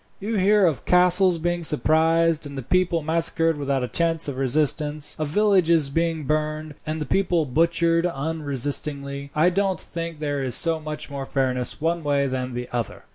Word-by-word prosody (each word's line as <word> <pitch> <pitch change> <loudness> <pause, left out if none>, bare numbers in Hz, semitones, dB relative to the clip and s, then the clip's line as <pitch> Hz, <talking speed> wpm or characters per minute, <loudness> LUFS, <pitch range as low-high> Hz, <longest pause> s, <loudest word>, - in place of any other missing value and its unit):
"You 215 +2 -3
hear 200 +1 +3
of 155 -8 -1
castles 180 0 +4
being 175 +1 -2
surprised, 160 +1 +2
and 140 -1 -9
the 135 - -5
people 175 +2 0
massacred 165 0 +1
without 140 -2 -2
a - - -2
chance 165 +5 -1
of 140 - -4
resistance; 145 +2 0
of 155 - -2
villages 170 -5 +2
being 165 0 -1
burned, 155 +1 -2
and 155 +1 -3
the 150 - -3
people 175 -4 0
butchered 170 +4 +2
unresistingly. 140 -2 -3
I 165 +4 +3
don't 195 0 -1
think 165 -1 -6
there 145 -2 -3
is 125 -3 +3
so 165 -1 +3
much 150 -1 -8
more 135 -1 -6
fairness 130 -2 -1
one 165 +2 -1
way 140 -1 +1
than 130 -2 -4
the 125 0 -5
other. 120 -2 -4
155 Hz, 175 wpm, -23 LUFS, 140-170 Hz, -, castles